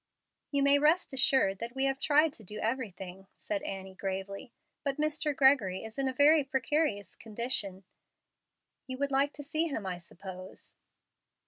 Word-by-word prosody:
"You 280 -1 +1
may 280 0 +5
rest 310 +2 +3
assured 260 -7 +3
that 235 +2 -6
we 265 - 0
have 270 0 +1
tried 300 +1 +4
to 220 - -11
do 210 +2 -8
everything," 195 -6 -4
said 310 -2 -3
Annie, 190 -8 -6
gravely, 195 +4 -5 0.3
"but 275 -2 -1
Mr. 300 -1 0
Gregory 260 -9 +4
is 220 +3 -8
in 270 - +1
a - - +1
very 290 +3 +5
precarious 270 -4 0
condition. 215 -4 -4 1.0
You 260 0 -5
would 280 +1 -1
like 275 +1 +3
to 290 - -8
see 315 +3 0
him, 225 -10 -4
I 180 -2 -3
suppose." 185 +2 -9
260 Hz, 160 wpm, -31 LUFS, 195-285 Hz, 1.0 s, may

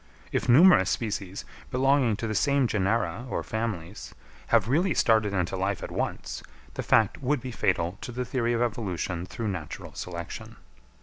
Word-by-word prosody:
If - - -1
numerous 175 +9 +7
species, 100 -4 -3 0.2
belonging 130 -3 +3
to 115 - -4
the 110 - -2
same 140 +3 +2
genera 115 +3 0
or - - -2
families, 105 -5 -4 0.3
have 115 -3 +3
really 165 +8 +2
started 110 -3 +3
into 90 -1 -1
life 95 +1 -1
at - - -6
once, - - -3 0.3
the - - -3
fact 110 +2 +2
would 140 +2 +1
be 125 +1 -6
fatal 90 -3 0
to - - -6
the 125 +1 -3
theory 120 -1 0
of 120 +1 +1
evolution 95 -6 -3
through 110 +2 -4
natural 90 -6 -6
selection. 85 -2 -7
110 Hz, 165 wpm, -27 LUFS, 95-125 Hz, 0.3 s, numerous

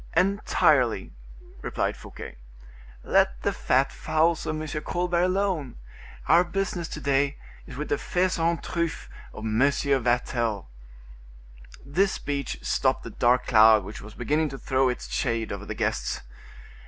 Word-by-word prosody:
"Entirely," 155 - +2 0.5
replied - - -2
Fouquet. - - -10 0.7
"Let - - +2
the - - +1
fat 135 +2 +1
fowls 160 +1 +1
of 155 - -2
M. 155 -1 -4
Colbert 175 +2 0
alone; 185 - 0 0.5
our 170 +3 +6
business 180 -2 -2
to 150 - -6
day 140 0 +1 0.3
is 130 - -9
with 150 - -4
the 145 - 0
faisans 170 -2 0
truffes 170 -2 -3 0.2
of 110 - -8
M. 110 0 0
Vatel." 120 - +1 1.2
This 185 +8 +1
speech 140 -2 -3
stopped - - +1
the - - -7
dark 125 +1 +2
cloud 110 -2 +6
which 105 +3 -8
was 105 +1 -11
beginning 150 +6 0
to 135 - -7
throw 130 0 +1
its 125 - -4
shade 115 -3 -1
over - - -6
the - - -4
guests. - - -2
140 Hz, 140 wpm, -26 LUFS, 120-170 Hz, 1.2 s, our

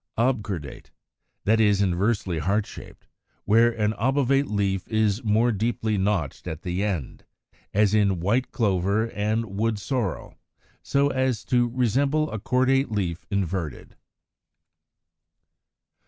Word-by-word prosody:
Obcordate, 105 - -2 0.6
that 110 +2 +3
is, 105 -3 +4
inversely 95 -1 0
heart 100 +6 0
shaped, - - -12 0.4
where 115 +3 +5
an 110 -2 0
obovate 135 +3 +2
leaf 100 -2 -1
is 110 +1 0
more 110 +3 +3
deeply 110 0 -1
notched 95 -7 -1
at 80 +1 -6
the 90 +2 -2
end 90 -11 -3 0.3
(Fig. - - -33 0.2
139), 105 - +4
as 105 -1 +2
in 100 -4 +2
White 115 +9 0
Clover 100 +1 0
and 105 0 -2
Wood 115 -1 +1
sorrel; 100 0 -3 0.4
so 140 0 +1
as 130 -5 -1
to 120 -1 +2
resemble 135 +6 +1
a 110 - -4
cordate 130 +5 +2
leaf 90 -5 -3
inverted. 90 -6 -3
105 Hz, 125 wpm, -25 LUFS, 95-120 Hz, 0.6 s, where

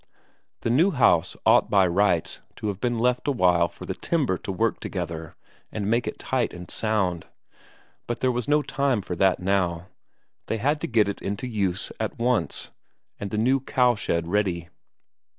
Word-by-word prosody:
The 115 - 0
new 160 +11 +4
house 115 - +3
ought - - +5
by 100 -3 +5
rights 90 -1 +1 0.2
to 105 - -3
have 100 -1 -5
been 120 -1 0
left 125 +3 +1
a - - +3
while 90 -8 +3
for - - -11
the - - -3
timber 145 - 0
to - - -5
work 110 +4 0
together 85 -3 -5 0.4
and 105 -1 -2
make 120 +1 +1
it - - -4
tight 130 -6 -1
and 90 0 -9
sound, 100 -6 -1 0.8
but 120 - -3
there 130 - +2
was 120 -2 -3
no 150 0 +3
time 140 -7 0
for 90 - -5
that 95 0 +3
now; 90 -2 0 0.6
they 115 - -1
had 145 +7 0
to - - -2
get 110 -4 +3
it 100 - -4
into 100 +5 -3
use 100 -5 -2
at 110 -1 -3
once, 120 0 0 0.5
and 100 - -4
the 105 - -3
new 130 +5 +3
cowshed 120 -10 +1
ready. 85 -2 -1
105 Hz, 180 wpm, -25 LUFS, 90-125 Hz, 0.8 s, ought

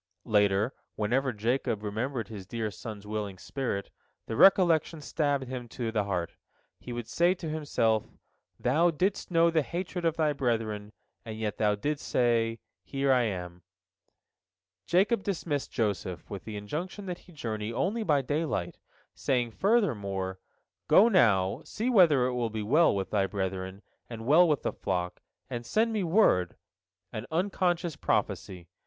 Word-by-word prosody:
Later, 105 +3 +2 0.2
whenever 125 +5 +1
Jacob 115 -1 -1
remembered 110 +2 -2
his 100 -4 -9
dear 110 -1 -3
son's 105 -1 -8
willing 105 -2 -4
spirit, 120 -4 -4 0.3
the 110 - -4
recollection 170 - +5
stabbed 145 -2 0
him 125 -1 -5
to 115 -1 -4
the 105 -2 0
heart. 90 -4 -2 0.5
He 125 - -8
would 120 -1 -5
say 175 +2 +2
to 175 -3 -7
himself, 140 -8 0 0.5
"Thou 155 +8 +3
didst 185 +5 -1
know 170 -1 +4
the 160 -1 +3
hatred 175 +3 -4
of 165 -1 +1
thy 155 -2 +2
brethren, 110 -6 -2 0.3
and 110 -1 -7
yet 110 -2 -3
thou 105 -1 +3
didst 145 +8 -3
say, 115 -2 +2 0.3
Here 135 0 0
am 90 -8 0 0.5
I." - - -42 0.8
Jacob 195 +5 +3
dismissed 165 -8 -2
Joseph, 100 -6 -2
with 100 -3 -6
the 110 -2 -5
injunction 170 - -5
that 180 -2 -5
he 180 - -18
journey 110 -8 -4
only 185 - -1
by 150 -9 +2
daylight, 145 - -2 0.3
saying 120 -3 0
furthermore, 100 - 0 0.5
"Go 220 +5 +7
now, 100 - +3
see 235 +4 -2
whether 160 - +5
it 125 -2 -1
be 110 -1 -2
well 150 +5 +4
with 95 -1 -3
thy 100 -2 +2
brethren, 95 0 -4 0.3
and 115 -1 -7
well 165 +7 +6
with 150 -3 +1
the - - -1
flock; 90 -2 -3 0.3
and 120 0 -5
send 225 - +1
me 210 -3 0
word"—an 115 - -1
unconscious 175 -1 0
prophecy. 90 -3 -2
120 Hz, 150 wpm, -29 LUFS, 105-165 Hz, 0.8 s, Go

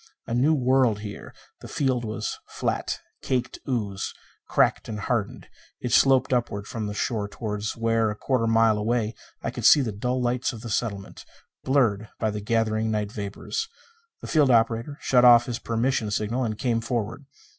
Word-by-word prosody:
A - - -4
new 140 +6 +3
world 130 -5 +2
here. 105 -1 -8 0.3
The - - -10
field 130 -4 0
was 110 0 -4
flat, - - -2 0.2
caked 125 -2 -2
ooze, 105 -6 -2 0.3
cracked - - +2
and 105 -2 -4
hardened. 110 -2 -2 0.3
It 125 - -4
sloped 130 0 +4
upward 105 -5 -1
from 110 -1 -4
the 105 - -5
shore 105 -2 -1
toward 105 -1 -5
where, 115 -1 +1
a 105 - -3
quarter 125 +1 0
of - - +1
a - - +2
mile 115 -2 +4
away, 115 0 0 0.3
I - - -2
could - - -7
see 145 - +7
the 120 -5 -2
dull 125 +5 -2
lights 125 +1 0
of 115 - -9
the 115 -2 -6
settlement, 100 -3 -3 0.4
blurred 115 -6 +1
by 110 -1 0
the 105 0 -4
gathered 110 0 0
night 105 -2 -1
vapors. 105 - -4 0.5
The - - -7
field 150 -4 +3
operator 115 +3 +2
shut 125 -2 +3
off 120 -1 +8
his 120 -2 -4
permission 115 -1 0
signal 110 +5 -1
and 110 -2 -3
came 115 -2 0
forward. 115 +3 -3
115 Hz, 180 wpm, -25 LUFS, 105-125 Hz, 0.5 s, off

